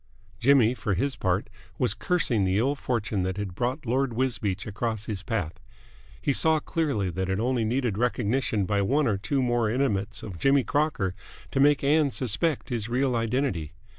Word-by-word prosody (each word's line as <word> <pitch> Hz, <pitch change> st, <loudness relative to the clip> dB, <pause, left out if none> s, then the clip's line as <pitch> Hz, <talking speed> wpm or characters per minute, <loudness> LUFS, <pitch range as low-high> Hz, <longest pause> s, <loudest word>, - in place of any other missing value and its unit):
Jimmy, 125 Hz, -2 st, +5 dB
for 105 Hz, -5 st, -2 dB
his 135 Hz, +8 st, 0 dB
part, 95 Hz, +2 st, 0 dB, 0.3 s
was 125 Hz, -, +2 dB
cursing 150 Hz, -, +1 dB
the 95 Hz, +1 st, +1 dB
ill 130 Hz, +6 st, +2 dB
fortune 115 Hz, -7 st, -2 dB
that 95 Hz, +1 st, -2 dB
had 100 Hz, -3 st, -4 dB
brought 125 Hz, -, -2 dB
Lord 130 Hz, +1 st, 0 dB
Wisbeach 110 Hz, -7 st, -1 dB
across 110 Hz, 0 st, -3 dB
his 105 Hz, -4 st, -4 dB
path. 95 Hz, -7 st, -3 dB, 0.6 s
He 140 Hz, -, 0 dB
saw 160 Hz, +3 st, +3 dB
clearly 140 Hz, -, -1 dB
that 95 Hz, +2 st, -3 dB
it 95 Hz, +1 st, 0 dB
only 120 Hz, 0 st, +1 dB
needed 115 Hz, -2 st, 0 dB
recognition 120 Hz, -3 st, 0 dB
by 100 Hz, +1 st, +1 dB
one 140 Hz, +9 st, +2 dB
or 105 Hz, -5 st, +1 dB
two 135 Hz, +6 st, 0 dB
more 120 Hz, -3 st, +1 dB
intimates 110 Hz, -4 st, -1 dB
of 90 Hz, -6 st, -7 dB
Jimmy 135 Hz, -1 st, +4 dB
Crocker 145 Hz, -12 st, 0 dB, 0.4 s
to 135 Hz, -, 0 dB
make 145 Hz, +1 st, +4 dB
Ann 150 Hz, +1 st, +3 dB
suspect 130 Hz, +5 st, -1 dB
his 115 Hz, -3 st, -3 dB
real 125 Hz, +1 st, +1 dB
identity. 115 Hz, -, -1 dB
120 Hz, 175 wpm, -26 LUFS, 100-135 Hz, 0.6 s, Jimmy